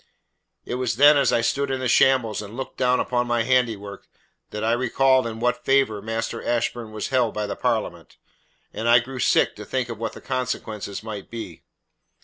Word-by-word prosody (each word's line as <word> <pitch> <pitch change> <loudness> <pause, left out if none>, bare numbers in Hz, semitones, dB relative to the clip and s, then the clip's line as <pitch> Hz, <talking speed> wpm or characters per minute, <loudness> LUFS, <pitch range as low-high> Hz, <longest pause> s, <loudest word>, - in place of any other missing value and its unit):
"It - - -5
was 120 -3 -1
then 145 +4 +7
as 140 -3 +3
I 115 - +2
stood 140 +4 0
in 135 -1 -1
that 130 -1 -1
shambles 115 -5 +3
and 105 +3 -9
looked 135 - -6
down 125 -1 +2
upon 125 -1 0
my 120 -1 +1
handiwork 115 -5 -1 0.4
that 105 0 -5
I 115 - +2
recalled 130 +1 +2
in 110 -1 -6
what 125 +1 0
favour 135 -7 +2
Master 115 +1 -4
Ashburn 120 -1 -2
was 110 -1 -4
held 125 -4 +1
by 105 0 -1
the 100 - -4
Parliament, - - -3 0.6
and 115 +2 -2
I 120 - +8
grew 125 +2 -3
sick - - +2
to 105 - -7
think 125 +3 -3
of 115 -2 -6
what 115 -1 -3
the - - -10
consequences 110 -6 -4
might 105 -3 -7
be. 110 -8 -8
120 Hz, 195 wpm, -23 LUFS, 110-130 Hz, 0.6 s, I